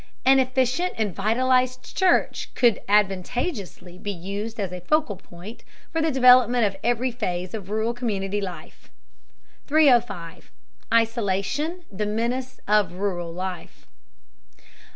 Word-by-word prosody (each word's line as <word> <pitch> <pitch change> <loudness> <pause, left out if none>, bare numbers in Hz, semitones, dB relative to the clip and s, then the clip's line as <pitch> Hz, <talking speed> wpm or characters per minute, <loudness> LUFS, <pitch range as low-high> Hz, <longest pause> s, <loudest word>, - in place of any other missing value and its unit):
An 265 +1 +6
efficient 260 +6 +1
and 215 -4 -1
vitalized 255 +4 +1
church 375 -2 +2
could 240 -3 +3
advantageously 195 - -1
be 205 - -5
used 200 +5 -5
as 195 -3 -2
a 180 0 -7
focal 300 - +1
point 185 +4 -12 0.3
for 325 - 0
the 320 - +2
development 250 -3 +5
of 200 -1 -1
every 240 +2 +1
phase 180 -6 -4
of 200 -4 -6
rural 220 +2 -1
community 205 -4 -2
life. 180 -5 -9 0.8
305. 240 - +2 0.4
ISOLATION 230 - 0
THE 205 +1 -3
MENACE 240 +4 -2
OF 205 -4 +2
RURAL 180 -3 -3
LIFE. 180 0 -7
220 Hz, 120 wpm, -24 LUFS, 195-255 Hz, 0.8 s, An